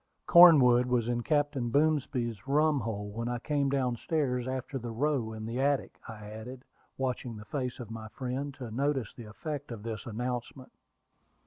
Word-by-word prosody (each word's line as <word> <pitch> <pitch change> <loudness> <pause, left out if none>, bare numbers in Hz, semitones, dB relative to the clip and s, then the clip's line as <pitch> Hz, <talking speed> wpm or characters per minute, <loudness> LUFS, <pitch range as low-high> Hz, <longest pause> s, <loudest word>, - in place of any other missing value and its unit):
"Cornwood 130 -8 +8
was 125 -2 +1
in 120 0 0
Captain 145 -3 0
Boomsby's 135 -6 0
rumhole 135 -9 +1
when 115 +3 -4
I 120 0 -1
came 140 +2 0
down 130 -3 0
stairs 125 -4 -1
after 130 +1 -3
the 120 0 -6
row 125 -1 0
in 110 0 -6
the 120 +3 -2
attic," 140 0 0
I 110 -2 -9
added, 120 +5 -9 0.3
watching 125 -3 -3
the 105 - -10
face 125 +3 -4
of 115 -3 -8
my 110 -1 -7
friend 130 +4 -4
to 125 -5 -7
notice 135 -1 -1
the 120 - -10
effect 145 +5 -6
of 110 -3 -7
this 110 -1 -5
announcement. 125 +3 -4
125 Hz, 165 wpm, -30 LUFS, 115-140 Hz, 0.3 s, Cornwood